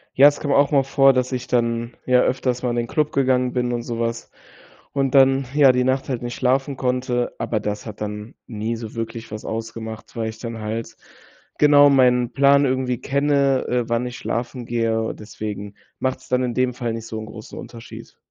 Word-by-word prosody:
Ja, 140 +2 +8
es 145 - +1
kam 145 - -2
auch 140 +1 +4
mal 140 -2 +4
vor, 135 0 +4
dass 130 0 0
ich 125 -1 -4
dann, 115 -1 0
ja, 125 -1 +4
öfters 125 -1 0
mal 125 - 0
in - - -2
den 120 -1 -1
Club 150 +2 0
gegangen 130 -2 +1
bin 125 -1 0
und 120 - -2
so 115 -1 -5
was 115 0 -3 0.6
und 135 -2 0
dann, 135 0 +5
ja, 140 -3 +6
die 125 0 +1
Nacht 130 +2 0
halt 125 -3 -2
nicht 120 -1 -4
schlafen 135 +2 +1
konnte. 125 -1 -1
Aber 110 - -1
das 105 +1 -4
hat 105 -2 -9
dann 105 +3 -5
nie 110 0 -3
so 115 -1 -8
wirklich 115 0 -5
was 110 0 -7
ausgemacht, 110 0 -6
weil 115 -1 -2
ich 110 0 -10
dann 115 -1 -6
halt 115 +1 -5 0.6
genau 145 -1 +7
meinen 125 -3 +3
Plan 140 +2 +4
irgendwie 130 -2 0
kenne, 140 -1 +1
äh, 120 -2 -1
wann 120 +1 0
ich 120 -1 -7
schlafen 120 +1 -4
gehe. 115 -1 -1
Deswegen 105 -1 -7 0.2
macht's 130 0 -3
dann 125 0 +2
in 125 -1 -1
dem 125 0 +1
Fall 120 -2 -3
nicht 115 0 -6
so 110 - -5
'n 110 - -6
großen 110 0 -10
Unterschied. 115 -1 -11
125 Hz, 205 wpm, -22 LUFS, 115-130 Hz, 0.6 s, Ja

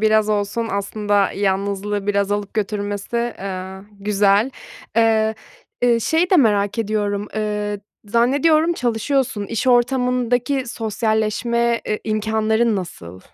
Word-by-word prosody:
biraz 215 0 +3
olsun 210 +2 -1
aslında 200 0 0
yanlızlığı 200 +1 -1
biraz 200 0 +1
alıp 205 -1 -3
götürmesi, 210 +3 -2
eee, 190 -1 -5 0.2
güzel. 205 +3 +3 0.5
Eee, 220 -1 +3 0.5
eee, 240 -1 +4
şeyi 325 +8 +1
de 375 - +6
merak 205 - +2
ediyorum, 205 -2 -1
eee, 210 -1 -2 0.2
zannediyorum 285 +9 +3
çalışıyorsun. 245 -3 -1
İş 230 +4 -3
ortamındaki 250 +1 +2
sosyalleşme, 225 +1 0
e 210 - 0
imkânların 220 +1 +1
nasıl? 95 - -7
215 Hz, 110 wpm, -20 LUFS, 205-235 Hz, 0.5 s, de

